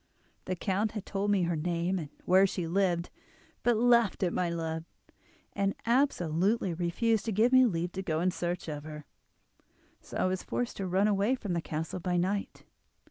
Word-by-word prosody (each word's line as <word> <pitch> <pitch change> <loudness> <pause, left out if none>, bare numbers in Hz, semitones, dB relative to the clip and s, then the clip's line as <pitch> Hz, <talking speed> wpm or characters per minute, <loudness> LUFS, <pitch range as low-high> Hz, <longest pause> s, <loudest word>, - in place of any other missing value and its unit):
The 185 - -2
count 200 +3 -1
had 210 -3 -5
told 200 0 -2
me 200 -3 +3
her 170 0 0
name, 170 +3 -1
and 150 -4 -6 0.2
where 190 +2 +5
she 180 -2 -3
lived, 175 0 0 0.5
but 240 -2 +2
laughed 235 -4 +3
at 175 - +1
my 180 -1 0
love, 160 -1 -3 0.7
and 195 0 0
absolutely 200 - +1
refused 185 +6 0
to 225 - -1
give 220 +5 +3
me 255 -1 +7
leave 175 -3 -2
to 190 - -4
go 160 -4 -1
in 180 +2 +2
search 175 -1 -3
of 150 -2 -5
her, 150 -1 -8 1.0
so - - -8
I - - +1
was 185 0 0
forced 245 -1 -3
to 195 - -3
run 190 +3 +2
away 205 +4 +2
from 205 -8 -4
the 170 - 0
castle 160 +3 -4
by 180 0 -1
night. 195 +3 -2
185 Hz, 190 wpm, -30 LUFS, 170-205 Hz, 1.0 s, me